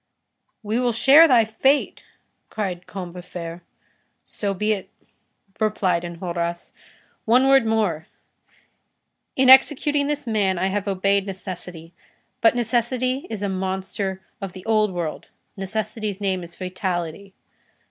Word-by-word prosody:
"We 215 +3 -1
will 245 -1 +1
share 280 +8 +7
thy 240 -6 +5
fate," 265 +6 +1 0.5
cried 185 -5 -4
Combeferre. 175 -2 -7 0.6
"So 200 -2 -3
be 210 +3 0
it," 195 -3 -6 0.7
replied 200 -5 +1
Enjolras. 170 0 -4 0.5
"One 250 +4 +4
word 270 -4 +5
more. 205 -8 0 1.3
In 260 0 +3
executing 285 +2 +5
this 295 -1 -2
man, 205 -5 +1
I 190 +2 0
have 205 +1 -2
obeyed 195 +1 +1
necessity; 180 -3 -7 0.5
but 230 - +5
necessity 245 +3 0
is 215 -3 -5
a - - 0
monster 190 0 -3 0.2
of 195 -2 -5
the 185 -1 -11
old 215 -2 +2
world, 170 -4 -4 0.3
necessity's 215 +1 -4
name 190 -2 -1
is 170 0 -11
Fatality. 185 0 -4
200 Hz, 120 wpm, -23 LUFS, 185-225 Hz, 1.3 s, share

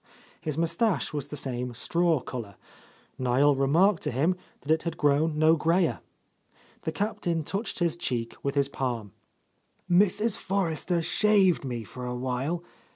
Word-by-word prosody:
His 155 -2 -3
moustache 170 +2 0
was 145 -2 -3
the 150 - -6
same 125 -2 -3
straw 165 +4 +2
colour; 115 -6 -7 0.6
Niel 130 +3 +4
remarked 160 +8 +3
to - - -1
him 155 +9 +1 0.3
that 150 - -2
it 160 0 +3
had 170 -1 -4
grown 150 +2 +2
no 155 +1 +5
grayer. 165 +4 +2 0.9
The - - 0
Captain 175 -6 -1
touched 200 +8 -3
his 170 -2 +1
cheek 120 -9 -3
with 140 +1 -2
his 140 -1 +3
palm. 120 -7 -3 0.8
"Mrs. 205 +4 +3
Forrester 175 -2 -1
shaved 200 -3 +3
me 120 -4 -4
for 125 +4 -7
awhile. 130 +7 -2
155 Hz, 145 wpm, -27 LUFS, 130-175 Hz, 0.9 s, no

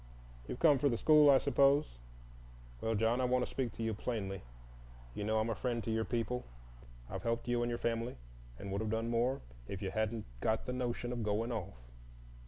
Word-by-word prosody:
"You've - - -4
come 145 -2 +5
for 145 - +3
the 115 - 0
school, 150 +1 +6
I 135 - +8
suppose. 140 - +3 0.8
Well 110 0 0
John, 115 +4 +2
I - - +2
want 125 0 +2
to - - -11
speak 130 -4 -1
to 115 - -5
you 115 0 0
plainly. 100 -3 -3 0.7
You 105 - -4
know 110 +1 +1
I'm 110 +1 0
a - - +1
friend 120 -1 -2
to 115 - -2
your 110 0 0
people. 125 +1 -1 0.6
I've - - -5
helped 115 0 -1
you 120 0 +1
and 120 - 0
your 120 - -1
family, 115 +1 -2 0.4
and 100 - -6
would 100 +2 -1
have 110 - -2
done 115 +1 -1
more 120 +3 +1 0.3
if 95 - -5
you 95 -2 -3
hadn't 110 +1 -1
got 110 - 0
the 125 - -3
notion 120 -1 -2
of 120 - -3
going 110 +3 0
off. 110 - -4
115 Hz, 210 wpm, -34 LUFS, 110-125 Hz, 0.8 s, I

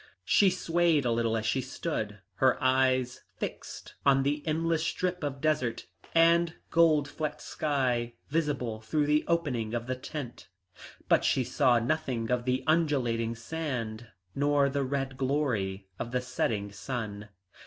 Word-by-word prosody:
She 200 - +5
swayed 170 -5 +2
a 120 - +2
little 115 -1 +1
as 110 - -3
she 130 +4 +1
stood, 110 - -4 0.2
her 130 +4 +4
eyes 130 -1 +2 0.2
fixed - - -6
on 135 -1 +4
the 145 +2 0
endless 160 +1 +1
strip 180 0 -2
of 140 -2 -3
desert 150 -7 0 0.3
and 170 0 +4 0.2
gold 155 -3 +4
flecked 150 -1 -4
sky 125 -5 -1
visible 140 -8 -1
through 145 +7 0
the 150 +1 +3
opening 130 -10 0
of 120 0 -2
the 130 +1 -2
tent, 130 -1 -7 0.6
but - - +4
she - - +2
saw 125 -2 +3
nothing 125 -2 -1
of 125 -1 0
the 130 0 0
undulating 130 -8 +1
sand, 120 -4 -4 0.3
nor 145 0 +2
the 140 +1 -1
red 135 0 -2
glory 120 -9 -1
of 120 - -3
the 125 0 0
setting 110 -5 -2
sun. 105 -1 -5
130 Hz, 145 wpm, -29 LUFS, 120-155 Hz, 0.6 s, She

